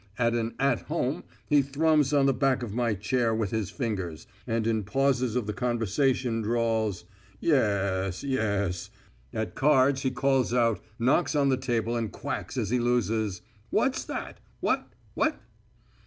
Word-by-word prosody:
At 115 Hz, -1 st, +2 dB
an 115 Hz, -1 st, -1 dB
"at 135 Hz, -3 st, +2 dB
home" 150 Hz, -1 st, -1 dB, 0.2 s
he 145 Hz, -2 st, +4 dB
thrums 145 Hz, +1 st, +2 dB
on 140 Hz, -2 st, +4 dB
the 135 Hz, -, +4 dB
back 130 Hz, 0 st, +1 dB
of 110 Hz, -4 st, -5 dB
my 120 Hz, -2 st, +1 dB
chair 115 Hz, +3 st, 0 dB
with 110 Hz, -3 st, -1 dB
his 110 Hz, -4 st, -1 dB
fingers, 95 Hz, -, -4 dB, 0.2 s
and 115 Hz, -1 st, 0 dB
in 110 Hz, -2 st, +1 dB
pauses 130 Hz, +1 st, +1 dB
of 125 Hz, -4 st, 0 dB
the 105 Hz, -, -3 dB
conversation 120 Hz, +1 st, 0 dB
drawls, 110 Hz, -3 st, 0 dB, 0.4 s
"y -, -, -1 dB
e -, -, +5 dB
s, 100 Hz, -, +1 dB
y 140 Hz, -, -3 dB
es." 100 Hz, -7 st, -1 dB, 0.4 s
At 110 Hz, 0 st, -3 dB
cards 135 Hz, -1 st, +3 dB
he 130 Hz, -, +1 dB
calls 130 Hz, -2 st, +1 dB
out, 115 Hz, -3 st, +2 dB, 0.2 s
knocks 135 Hz, +8 st, +2 dB
on 140 Hz, -1 st, +3 dB
the 130 Hz, -, +4 dB
table 120 Hz, -3 st, -1 dB
and 115 Hz, -3 st, -2 dB
quacks -, -, -5 dB
as 110 Hz, -4 st, -1 dB
he 125 Hz, -, +2 dB
loses: 110 Hz, -5 st, 0 dB, 0.3 s
"What's 265 Hz, 0 st, +1 dB
that? -, -, -6 dB, 0.2 s
What? -, -, 0 dB, 0.2 s
What?" -, -, 0 dB
120 Hz, 170 wpm, -27 LUFS, 110-135 Hz, 0.4 s, e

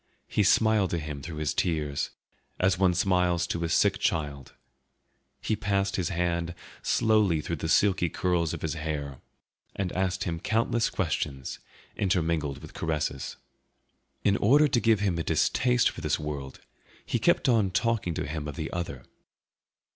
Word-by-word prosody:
He -, -, +1 dB
smiled 110 Hz, -1 st, +4 dB
to 85 Hz, -, -1 dB
him 75 Hz, -3 st, -5 dB
through 80 Hz, +3 st, -7 dB
his 75 Hz, -3 st, -1 dB
tears, 75 Hz, -5 st, -1 dB, 0.5 s
as 90 Hz, -1 st, +2 dB
one 90 Hz, -2 st, +3 dB
smiles 90 Hz, -1 st, +2 dB
to 85 Hz, -1 st, -3 dB
a 85 Hz, -, -1 dB
sick -, -, +3 dB
child; 70 Hz, -4 st, -2 dB, 0.9 s
he 110 Hz, -, +1 dB
passed 100 Hz, -2 st, 0 dB
his 90 Hz, -3 st, -1 dB
hand 85 Hz, -1 st, -1 dB, 0.3 s
slowly 110 Hz, -7 st, +3 dB
through 85 Hz, +2 st, -3 dB
the 80 Hz, -, -3 dB
silky 95 Hz, -2 st, +3 dB
curls 85 Hz, -1 st, 0 dB
of -, -, -6 dB
his 80 Hz, -, -1 dB
hair, 75 Hz, -4 st, -4 dB, 0.6 s
and 95 Hz, -2 st, -2 dB
asked 95 Hz, 0 st, -1 dB
him 85 Hz, -3 st, -3 dB
countless 115 Hz, +4 st, +1 dB
questions, 75 Hz, -7 st, -3 dB, 0.4 s
intermingled 80 Hz, -7 st, 0 dB
with -, -, -11 dB
caresses. 75 Hz, -4 st, -3 dB, 0.9 s
In 100 Hz, 0 st, +3 dB
order 145 Hz, +8 st, +5 dB
to 130 Hz, -, +2 dB
give 115 Hz, -3 st, +3 dB
him 95 Hz, -5 st, 0 dB
a -, -, -1 dB
distaste 125 Hz, +6 st, +2 dB
for -, -, -9 dB
this -, -, +1 dB
world 70 Hz, -3 st, -6 dB, 0.4 s
he -, -, -1 dB
kept -, -, +3 dB
on 115 Hz, -6 st, +3 dB
talking 105 Hz, -3 st, 0 dB
to -, -, -2 dB
him 75 Hz, 0 st, -4 dB
of 70 Hz, -, -6 dB
the 80 Hz, +2 st, -4 dB
other. 85 Hz, 0 st, -4 dB
85 Hz, 160 wpm, -28 LUFS, 75-100 Hz, 0.9 s, order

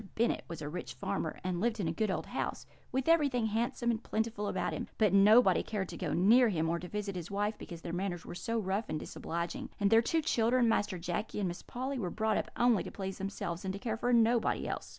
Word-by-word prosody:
Bennet 235 Hz, +2 st, +1 dB
was 165 Hz, -2 st, -6 dB
a -, -, -4 dB
rich 175 Hz, +4 st, -6 dB
farmer, 200 Hz, 0 st, -3 dB
and 180 Hz, -1 st, -2 dB
lived 230 Hz, 0 st, 0 dB
in 185 Hz, -, 0 dB
a -, -, +1 dB
good 215 Hz, +5 st, 0 dB
old 190 Hz, -, -2 dB
house, -, -, -3 dB, 0.3 s
with 265 Hz, +2 st, -1 dB
everything 285 Hz, -8 st, +3 dB
handsome 235 Hz, +2 st, 0 dB
and 225 Hz, -1 st, -2 dB
plentiful 220 Hz, -1 st, -2 dB
about -, -, -1 dB
him; -, -, -4 dB
but 210 Hz, -4 st, +3 dB
nobody 210 Hz, +5 st, +6 dB
cared 200 Hz, -4 st, -3 dB
to -, -, -7 dB
go 180 Hz, -5 st, -3 dB
near 225 Hz, -, +5 dB
him 165 Hz, -4 st, 0 dB
or 170 Hz, -, 0 dB
to 180 Hz, -, -7 dB
visit 205 Hz, 0 st, -4 dB
his 175 Hz, -2 st, -5 dB
wife, 205 Hz, +2 st, -1 dB
because 170 Hz, -2 st, -8 dB
their 170 Hz, -, -5 dB
manners 175 Hz, -2 st, -3 dB
were -, -, -7 dB
so 230 Hz, +6 st, -2 dB
rough 205 Hz, +1 st, -1 dB
and 155 Hz, -, -2 dB
disobliging; 170 Hz, +2 st, -4 dB
and 200 Hz, -1 st, +2 dB
their 225 Hz, 0 st, +7 dB
two 320 Hz, +6 st, 0 dB
children, 240 Hz, -3 st, +3 dB
Master 205 Hz, -4 st, +1 dB
Jacky 175 Hz, +5 st, -3 dB
and 200 Hz, -2 st, 0 dB
Miss 175 Hz, 0 st, -5 dB
Polly, 260 Hz, +2 st, -4 dB
were 185 Hz, -6 st, -2 dB
brought 220 Hz, +3 st, 0 dB
up -, -, -2 dB
only 240 Hz, -5 st, +4 dB
to -, -, -6 dB
please 190 Hz, -1 st, -5 dB
themselves 190 Hz, -3 st, -4 dB
and 190 Hz, -, -2 dB
to 200 Hz, -, -5 dB
care 220 Hz, 0 st, -2 dB
for 245 Hz, +2 st, 0 dB
nobody 235 Hz, 0 st, +3 dB
else. -, -, -4 dB
210 Hz, 245 wpm, -32 LUFS, 180-230 Hz, 0.3 s, their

